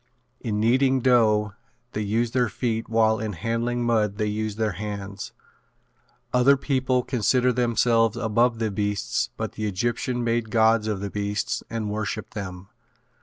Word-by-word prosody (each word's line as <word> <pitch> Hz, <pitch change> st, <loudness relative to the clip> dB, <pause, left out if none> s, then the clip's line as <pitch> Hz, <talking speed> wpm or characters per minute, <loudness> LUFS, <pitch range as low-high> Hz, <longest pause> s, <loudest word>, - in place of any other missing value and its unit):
In 105 Hz, -2 st, -2 dB
kneading 130 Hz, +4 st, +3 dB
dough 110 Hz, -4 st, +3 dB, 0.4 s
they 105 Hz, -, -3 dB
use 110 Hz, +3 st, 0 dB
their 125 Hz, -2 st, +1 dB
feet 115 Hz, +1 st, -2 dB
while 110 Hz, -1 st, +3 dB
in 110 Hz, -1 st, -3 dB
handling 115 Hz, +6 st, -1 dB
mud 110 Hz, -4 st, +1 dB
they 105 Hz, -, 0 dB
use 105 Hz, 0 st, -2 dB
their 110 Hz, -1 st, 0 dB
hands. 100 Hz, +1 st, -6 dB, 1.0 s
Other 130 Hz, +3 st, +5 dB
peoples 130 Hz, -2 st, 0 dB
consider 125 Hz, +1 st, +2 dB
themselves 115 Hz, -1 st, +2 dB
above 115 Hz, +1 st, +2 dB
the 110 Hz, -2 st, -1 dB
beasts 105 Hz, 0 st, -1 dB
but -, -, -3 dB
the 110 Hz, 0 st, -3 dB
Egyptians 120 Hz, +4 st, -1 dB
made 115 Hz, -1 st, 0 dB
gods 110 Hz, -1 st, +3 dB
of 105 Hz, -3 st, -2 dB
the 100 Hz, -1 st, -4 dB
beasts 105 Hz, +4 st, -2 dB
and 110 Hz, -2 st, -3 dB
worshipped 110 Hz, 0 st, -4 dB
them. 95 Hz, -2 st, -7 dB
110 Hz, 150 wpm, -25 LUFS, 105-120 Hz, 1.0 s, Other